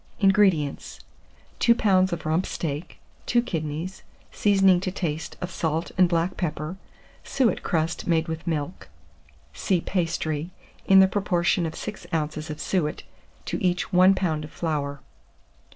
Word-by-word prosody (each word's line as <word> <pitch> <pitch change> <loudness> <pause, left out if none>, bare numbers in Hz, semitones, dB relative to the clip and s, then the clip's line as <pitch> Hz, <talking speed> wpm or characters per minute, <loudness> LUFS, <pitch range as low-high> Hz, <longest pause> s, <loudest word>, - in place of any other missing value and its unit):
605. 195 - +3
INGREDIENTS. 190 -8 +1 0.6
2 235 - +5
lbs. 190 -4 +3
of 170 -3 -4
rump 160 +4 +1
steak, 155 +1 -4 0.3
2 240 - +3
kidneys, 165 -2 -4 0.3
seasoning 195 -3 +4
to 185 - -2
taste 165 -4 -4
of 180 - -4
salt 160 0 -2
and 185 -1 +4
black 170 +2 0
pepper, 155 0 -3 0.5
suet 260 -5 +1
crust 165 -2 -1
made 165 -1 +2
with 160 +1 -5
milk 160 - -3 0.6
(see 185 - 0
Pastry), 165 -3 -2 0.4
in 190 0 +8
the 190 - +6
proportion 180 -2 +1
of 160 - -7
6 210 -1 -7
oz. 155 -1 -2
of 150 - -6
suet 160 -6 -1 0.4
to - - -3
each 180 +1 0
1 185 +2 +6
lb. 160 -5 -1
of 150 - -8
flour. 145 -4 -3
170 Hz, 145 wpm, -25 LUFS, 155-190 Hz, 0.6 s, in